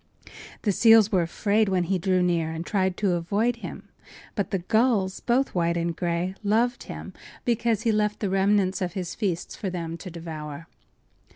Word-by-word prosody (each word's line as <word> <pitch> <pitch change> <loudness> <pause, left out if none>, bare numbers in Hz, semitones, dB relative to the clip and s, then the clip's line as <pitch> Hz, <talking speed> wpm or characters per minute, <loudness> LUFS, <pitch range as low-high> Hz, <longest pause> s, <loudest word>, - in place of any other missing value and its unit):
The 210 - +2
seals 225 0 +6
were 185 -3 +3
afraid 205 +5 +1
when 185 -2 +2
he 185 +2 0
drew 185 0 +2
near, 170 -2 +1
and 160 +1 -5
tried 190 -2 0
to 200 -3 +1
avoid 200 +8 0
him; - - -8 0.5
but 200 - -2
the 195 - 0
gulls, 210 0 +1
both 255 +3 +1
white 170 -1 +1
and 170 0 -1
gray, 175 +1 -1
loved 230 +4 +1
him - - -8 0.3
because 230 -2 +1
he 230 - +3
left 210 -1 0
the 205 - -1
remnants 195 0 +2
of 180 -2 -2
his 185 -3 -4
feasts 185 -6 -3
for 195 - -3
them 170 -2 -4
to 185 - -8
devour. 160 -2 -7
190 Hz, 180 wpm, -26 LUFS, 170-215 Hz, 0.5 s, seals